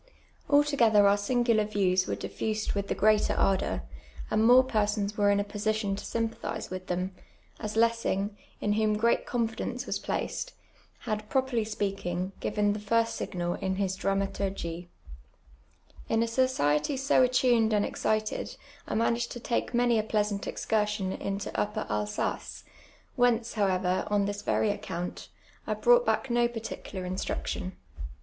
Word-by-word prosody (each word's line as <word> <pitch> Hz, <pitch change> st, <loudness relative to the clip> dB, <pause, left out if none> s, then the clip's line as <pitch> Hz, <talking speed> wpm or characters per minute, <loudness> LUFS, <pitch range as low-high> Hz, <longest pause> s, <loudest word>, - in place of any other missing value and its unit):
Altogether 260 Hz, -8 st, +5 dB
om* 200 Hz, -, +5 dB
singular 230 Hz, +1 st, +2 dB
views 190 Hz, -3 st, +1 dB
were -, -, -1 dB
diifused 215 Hz, -1 st, -3 dB
with 200 Hz, -1 st, -2 dB
the -, -, -1 dB
greater 215 Hz, 0 st, +3 dB
ardour, 195 Hz, -1 st, +1 dB, 0.5 s
and 215 Hz, -, +3 dB
more 250 Hz, +3 st, +7 dB
persons 210 Hz, -4 st, 0 dB
were 205 Hz, -1 st, +3 dB
in 200 Hz, 0 st, +3 dB
a -, -, +1 dB
position 205 Hz, 0 st, -1 dB
to -, -, -7 dB
sjnnpathize 230 Hz, -4 st, -3 dB
with 185 Hz, 0 st, -6 dB
them, 180 Hz, +1 st, -2 dB, 0.5 s
as 215 Hz, -1 st, -4 dB
Lessing, 225 Hz, -3 st, +1 dB, 0.2 s
in 205 Hz, -, +1 dB
whom 215 Hz, 0 st, +2 dB
great 230 Hz, +2 st, +2 dB
confidence 235 Hz, +1 st, -2 dB
was -, -, -2 dB
placed, -, -, -3 dB, 0.5 s
had, 215 Hz, -2 st, -3 dB
properly 260 Hz, -4 st, +1 dB
speaking, 195 Hz, -3 st, -2 dB
given 210 Hz, -1 st, +1 dB
the 210 Hz, -, -4 dB
fii'st 230 Hz, +2 st, +2 dB
signal 175 Hz, -5 st, -3 dB
in 190 Hz, 0 st, -2 dB
his 190 Hz, -1 st, -1 dB
Dramaturgie. 195 Hz, -3 st, -2 dB, 1.2 s
In 225 Hz, 0 st, +3 dB
a -, -, -1 dB
society 230 Hz, -, +1 dB
so 275 Hz, 0 st, +3 dB
attuned 245 Hz, -3 st, +3 dB
and 210 Hz, -1 st, +2 dB
excited 215 Hz, 0 st, -1 dB, 0.3 s
I -, -, -2 dB
managed 235 Hz, +1 st, +1 dB
to 240 Hz, -, -7 dB
take 235 Hz, -, -1 dB
many 240 Hz, -2 st, +3 dB
a -, -, 0 dB
pleasant 210 Hz, -2 st, -1 dB
excursion 210 Hz, -3 st, -1 dB
into 200 Hz, 0 st, -4 dB
Tapper 210 Hz, +1 st, -2 dB
Alsace, 105 Hz, 0 st, -2 dB, 0.5 s
whence, 240 Hz, -2 st, +2 dB
however, 185 Hz, -3 st, +1 dB
on 205 Hz, -1 st, +2 dB
this 205 Hz, 0 st, -3 dB
very 210 Hz, -, +1 dB
account, 180 Hz, -3 st, -5 dB, 0.4 s
I -, -, 0 dB
brought 485 Hz, 0 st, +4 dB
back 260 Hz, -, +1 dB
no 240 Hz, 0 st, +3 dB
particular 225 Hz, -5 st, -6 dB
instruction. 185 Hz, 0 st, -3 dB
210 Hz, 145 wpm, -28 LUFS, 195-230 Hz, 1.2 s, more